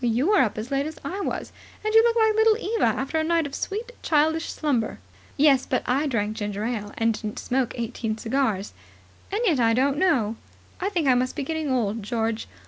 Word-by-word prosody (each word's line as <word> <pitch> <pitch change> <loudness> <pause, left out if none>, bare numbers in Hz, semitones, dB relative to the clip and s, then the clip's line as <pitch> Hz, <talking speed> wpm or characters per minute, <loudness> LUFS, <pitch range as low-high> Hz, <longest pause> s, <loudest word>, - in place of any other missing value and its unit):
"You 240 - +2
were 415 -2 +5
up 220 -4 0
as 220 +5 -5
late 275 +1 0
as 315 - -8
I 385 - -3
was, - - -3 0.3
and 430 - 0
you 450 - +8
look 470 0 +3
like 440 -1 +4
Little 440 0 +4
Eva 455 0 0
after 275 +4 -1
a - - +1
night 330 0 +1
of 280 - -6
sweet, 440 +5 -4
childish 320 +1 +1
slumber." 265 -8 -1 0.4
"Yes, 275 -2 +4
but 255 - 0
I 275 +5 +1
drank 215 -5 -1
ginger 205 -1 -3
ale, 215 -4 -3
and 225 0 +2
didn't 215 0 -6
smoke 255 -1 -1
eighteen 230 -2 -3
cigars. 225 -4 -1 0.6
And 415 +3 -1
yet, 325 - +3
I 230 -1 +3
don't 275 +3 +2
know. 240 - +2 0.4
I 385 - -1
think 345 -8 0
I 260 - +6
must 255 +1 0
be 290 - -2
getting 315 +1 -2
old, 225 -3 0
George. 225 +1 -2
265 Hz, 215 wpm, -25 LUFS, 225-325 Hz, 0.6 s, you